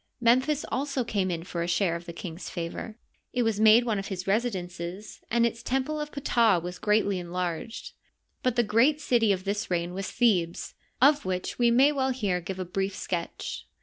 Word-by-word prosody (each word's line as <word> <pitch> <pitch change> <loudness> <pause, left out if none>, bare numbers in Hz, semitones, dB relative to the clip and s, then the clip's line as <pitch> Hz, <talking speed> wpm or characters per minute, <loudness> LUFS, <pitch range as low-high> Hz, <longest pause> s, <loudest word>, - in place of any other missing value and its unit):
Memphis 255 +5 +3
also 275 -1 -1
came 200 -5 -1
in 165 -2 -3
for 170 -1 -4
a 170 - -1
share 175 0 +1
of 170 0 -7
the - - -5
king's 170 0 -7
favor; 175 +6 -5 0.4
it 245 - +1
was 225 -2 0
made 220 +2 +6
one 220 -4 0
of 195 - -5
his 185 -2 -5
residences, 190 -3 -3
and 235 +1 +3
its 230 0 -2
temple 270 +4 -1
of 300 0 -5
Ptah 235 -8 +3
was 180 +2 -7
greatly 210 -3 +2
enlarged. 180 +4 -4 0.5
But 255 -2 +1
the 240 - +3
gn^at 235 +8 +3
city 235 -7 +2
of 185 -1 -1
this 205 +1 -2
reien 175 0 -1
was 195 +1 -4
Thebes, 185 -8 +1 0.3
of 290 +1 +5
which 185 +4 -3
we 240 -1 +5
may 260 +5 +5
well 265 -2 0
here 205 -9 -1
give 185 +2 -5
a 185 - -3
brief 195 +2 -2
sketch. 170 -4 -4
205 Hz, 195 wpm, -27 LUFS, 180-240 Hz, 0.5 s, made